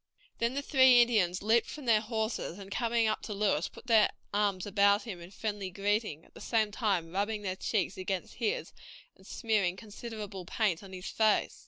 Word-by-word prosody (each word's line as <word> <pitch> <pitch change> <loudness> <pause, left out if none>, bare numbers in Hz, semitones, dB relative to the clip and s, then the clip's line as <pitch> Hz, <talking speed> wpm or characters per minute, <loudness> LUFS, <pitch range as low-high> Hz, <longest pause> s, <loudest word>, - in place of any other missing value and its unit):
Then 235 +3 0
the 280 - -2
three 260 -4 +6
Indians 200 -7 +1
leaped 225 +2 +3
from 295 -3 -8
their 220 -3 +4
horses, 220 -4 -3
and 200 -1 -10
coming 235 0 +1
up 215 0 0
to 210 - -5
Lewis, 200 -6 +1
put - - -14
their 225 -3 +5 0.2
arms 200 -3 +1
about 200 0 +3
him 195 -7 -7
in 170 - -10
friendly 205 -1 -4
greeting, 200 -3 -1
at - - -24
the - - -12
same 220 -3 +1
time 195 -7 -1
rubbing 205 +3 -1
their 185 -2 -2
cheeks 190 -1 -1
against 185 0 -4
his 465 +3 -2 0.4
and - - -19
smearing 210 -6 0
considerable 210 -2 -7
paint 185 -1 0
on 195 -2 -12
his 185 0 -8
face. 220 -1 +1
210 Hz, 190 wpm, -31 LUFS, 190-225 Hz, 0.4 s, three